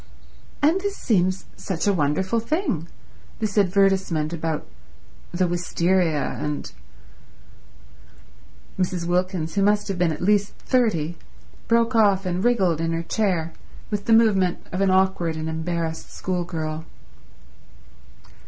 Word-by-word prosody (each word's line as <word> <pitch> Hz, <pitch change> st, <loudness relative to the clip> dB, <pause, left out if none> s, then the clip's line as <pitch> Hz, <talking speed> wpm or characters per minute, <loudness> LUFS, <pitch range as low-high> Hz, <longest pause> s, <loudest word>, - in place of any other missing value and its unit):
"And 330 Hz, +6 st, +4 dB
this 405 Hz, 0 st, -3 dB
seems 185 Hz, -4 st, +1 dB
such 185 Hz, -4 st, -3 dB
a 200 Hz, -, +3 dB
wonderful 185 Hz, +7 st, +1 dB
thing—this 220 Hz, -, -4 dB
advertisement 190 Hz, -5 st, +2 dB
about 160 Hz, -2 st, -2 dB, 0.7 s
the 180 Hz, +1 st, +1 dB
wisteria—and—" 170 Hz, -4 st, 0 dB, 2.1 s
Mrs. 180 Hz, -2 st, -1 dB
Wilkins, 180 Hz, -2 st, -1 dB
who 200 Hz, -, +1 dB
must 205 Hz, +1 st, +2 dB
have 190 Hz, -2 st, -2 dB
been 175 Hz, -2 st, +3 dB
at 155 Hz, -, -5 dB
least 205 Hz, +1 st, +2 dB
thirty, 175 Hz, -, 0 dB, 0.5 s
broke 230 Hz, +1 st, +3 dB
off 200 Hz, -4 st, +4 dB
and 180 Hz, +1 st, -1 dB
wriggled 190 Hz, -10 st, +2 dB
in 165 Hz, 0 st, 0 dB
her 165 Hz, 0 st, -2 dB
chair 170 Hz, -4 st, -1 dB, 0.4 s
with 205 Hz, -1 st, -2 dB
the 230 Hz, -, +3 dB
movement 200 Hz, -6 st, +3 dB
of 185 Hz, -, -2 dB
an 195 Hz, -, +3 dB
awkward 185 Hz, -3 st, +2 dB
and 155 Hz, 0 st, -4 dB
embarrassed 160 Hz, 0 st, -3 dB
schoolgirl. 165 Hz, -4 st, -3 dB
185 Hz, 115 wpm, -23 LUFS, 165-205 Hz, 2.1 s, And